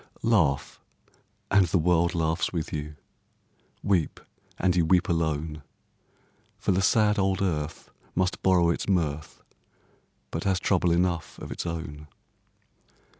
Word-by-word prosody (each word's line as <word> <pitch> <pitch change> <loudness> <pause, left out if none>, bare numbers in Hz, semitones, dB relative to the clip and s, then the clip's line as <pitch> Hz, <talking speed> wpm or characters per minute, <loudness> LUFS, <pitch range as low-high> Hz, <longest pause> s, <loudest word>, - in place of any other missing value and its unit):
Laugh, 90 -12 +1 0.7
and 100 -3 +5
the 95 - +1
world 85 0 +2
laughs 80 -1 0
with 85 -3 -4
you; 75 0 -4 0.9
Weep, 90 -6 +1 0.4
and 95 0 +1
you 85 - +3
weep 90 +2 +3
alone; 80 -2 -1 1.0
For - - 0
the 95 +1 +2
sad 105 +1 +3
old 95 -1 +1
earth 80 -5 -3 0.2
must 90 0 0
borrow 90 -3 +4
its 85 - -3
mirth, 75 -5 -1 0.9
But 80 - -3
has 95 -2 +1
trouble 90 -2 +2
enough 85 -1 0
of - - -8
its - - -4
own. 75 -3 -6
85 Hz, 125 wpm, -27 LUFS, 80-95 Hz, 1.0 s, and